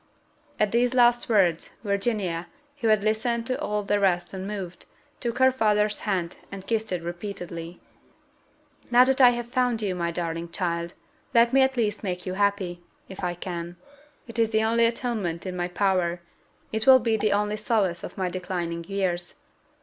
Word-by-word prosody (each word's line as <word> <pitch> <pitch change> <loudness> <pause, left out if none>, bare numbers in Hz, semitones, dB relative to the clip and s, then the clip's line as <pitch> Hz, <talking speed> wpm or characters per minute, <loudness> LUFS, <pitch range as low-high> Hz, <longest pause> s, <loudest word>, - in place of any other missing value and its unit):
At 210 -2 +2
these 245 +2 +2
last 240 -1 +4
words, 185 -7 +2
Virginia, 200 -5 -1 0.3
who 235 - -1
had 215 -2 +4
listened 230 +2 0
to 255 +1 -2
all 210 0 -1
the 205 +1 +1
rest 175 -3 +1
unmoved, 190 -1 -6 0.3
took 235 0 -3
her 260 0 +5
father's 210 -4 +1
hand, 185 -4 -2
and 195 -1 -8
kissed 220 -2 -1
it 180 -2 -2
repeatedly. 175 -1 -6 1.1
"Now 245 +1 +7
that 265 +1 +2
I 250 - +9
have 240 -1 -2
found 250 -3 +1
you, 195 -3 0
my 170 -1 -1
darling 170 0 -3
child, 170 -1 -3 0.4
let 235 +1 +5
me 270 - +6
at 265 0 +2
least 215 -3 0
make 180 -2 -3
you 185 - -3
happy, 195 -3 0 0.3
if 190 0 -9
I 175 -1 -1
can 175 -1 -6 0.5
it 230 -1 -6
is 225 -1 +3
the 220 0 +2
only 230 +1 +3
atonement 220 -8 -3
in 185 -1 -4
my 175 0 -1
power; 180 -2 +1 0.5
it 220 +2 -2
will 265 -1 +10
be 230 -3 +1
the 215 -1 +1
only 210 +1 +1
solace 210 -6 0
of - - -8
my 190 -1 0
declining 175 -2 -3
years. 180 -3 -2
200 Hz, 175 wpm, -26 LUFS, 175-230 Hz, 1.1 s, will